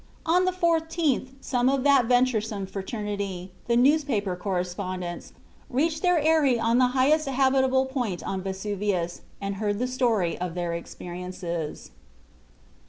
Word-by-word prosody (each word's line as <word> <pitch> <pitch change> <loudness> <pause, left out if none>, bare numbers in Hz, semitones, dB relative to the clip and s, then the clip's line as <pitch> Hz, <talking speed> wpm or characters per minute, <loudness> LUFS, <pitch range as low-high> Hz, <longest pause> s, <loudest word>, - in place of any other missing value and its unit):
On 355 +3 +3
the 370 - +2
14th 325 -6 +1
some 250 -1 +1
of 270 -1 +1
that 275 -4 +5
venturesome 225 -5 +1
fraternity, 195 -2 -4 0.2
the 235 0 +3
newspaper 250 - +2
correspondents, 180 -1 -4 0.4
reached 310 +5 0
their 360 -1 +3
eyrie 300 -5 +3
on 230 +2 +2
the 255 - +5
highest 300 +4 +3
habitable 265 0 +3
point 245 -9 -3
on 190 -1 -3
Vesuvius 190 -2 -2 0.2
and 200 0 -4
heard 205 0 -1
the 250 - 0
story 235 -9 +1
of 180 -2 -3
their 175 -1 -2
experiences. 175 -1 -6
230 Hz, 130 wpm, -26 LUFS, 185-270 Hz, 0.4 s, that